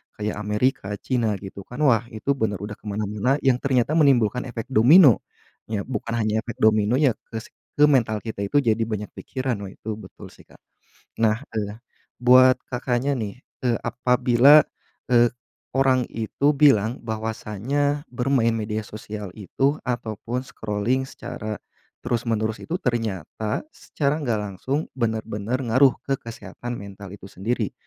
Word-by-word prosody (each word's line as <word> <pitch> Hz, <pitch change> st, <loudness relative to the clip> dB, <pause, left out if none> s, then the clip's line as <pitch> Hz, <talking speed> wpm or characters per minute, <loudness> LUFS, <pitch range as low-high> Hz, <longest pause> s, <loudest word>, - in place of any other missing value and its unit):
kayak 105 Hz, 0 st, -3 dB
Amerika, 105 Hz, 0 st, 0 dB
China 115 Hz, -3 st, -1 dB
gitu 95 Hz, 0 st, -9 dB
kan, 145 Hz, +5 st, -4 dB
wah 120 Hz, -4 st, +3 dB
itu 140 Hz, +6 st, -1 dB
bener 110 Hz, -6 st, 0 dB
udah 105 Hz, 0 st, -7 dB
ke 110 Hz, -, -13 dB
mana-mana 105 Hz, +5 st, 0 dB
yang 130 Hz, -2 st, +3 dB
ternyata 130 Hz, 0 st, +1 dB
menimbulkan 130 Hz, -6 st, +3 dB
efek 120 Hz, +1 st, -7 dB
domino. 130 Hz, -, +7 dB, 0.5 s
Ya 105 Hz, -2 st, -2 dB
bukan 115 Hz, -2 st, -4 dB
hanya 110 Hz, -1 st, +1 dB
efek 115 Hz, +1 st, -6 dB
dominonya 110 Hz, +6 st, +4 dB, 0.2 s
ke 110 Hz, -1 st, -6 dB
si -, -, -16 dB, 0.2 s
ke 150 Hz, +1 st, +5 dB
mental 110 Hz, -7 st, +2 dB
kita 110 Hz, -2 st, -5 dB
itu 100 Hz, +8 st, 0 dB
jadi 115 Hz, -4 st, +1 dB
banyak 105 Hz, -2 st, -3 dB
pikiran, 130 Hz, -2 st, -3 dB
wah 95 Hz, -, -6 dB
itu 110 Hz, +1 st, -6 dB
betul 110 Hz, -, -12 dB
sih, -, -, -17 dB
Kak. -, -, -21 dB, 0.6 s
Nah, 110 Hz, +1 st, +2 dB, 0.2 s
eee, 105 Hz, +1 st, -3 dB, 0.4 s
buat 130 Hz, +1 st, +6 dB
Kakaknya 125 Hz, +2 st, -1 dB
nih, 110 Hz, +2 st, -5 dB, 0.2 s
eee, 120 Hz, -2 st, +2 dB
apabila, 125 Hz, +4 st, +5 dB, 0.5 s
eee, 120 Hz, -1 st, +4 dB, 0.4 s
orang 130 Hz, -1 st, +3 dB
itu 125 Hz, +6 st, +1 dB
bilang 130 Hz, -5 st, +3 dB
bahwasanya 115 Hz, +6 st, -2 dB
bermain 125 Hz, -2 st, +2 dB
media 110 Hz, -1 st, -3 dB
sosial 105 Hz, -2 st, -8 dB
itu 135 Hz, +9 st, -1 dB
atau 110 Hz, -4 st, -3 dB
pun 125 Hz, +2 st, -3 dB
scrolling 120 Hz, +2 st, -2 dB
secara 110 Hz, -4 st, -6 dB, 0.5 s
terus-menerus 115 Hz, -2 st, -1 dB
itu, 170 Hz, -, -3 dB
ternyata 110 Hz, -, -2 dB
secara 150 Hz, +1 st, -2 dB
nggak 120 Hz, -6 st, 0 dB, 0.2 s
langsung 140 Hz, +4 st, -1 dB
bener-bener 110 Hz, -1 st, -2 dB
ngaruh 130 Hz, +3 st, +4 dB
ke 135 Hz, -1 st, -1 dB
kesehatan 115 Hz, +2 st, -7 dB
mental 100 Hz, 0 st, -9 dB
itu -, -, -16 dB
sendiri. 105 Hz, +3 st, -3 dB
115 Hz, 145 wpm, -24 LUFS, 105-130 Hz, 0.6 s, domino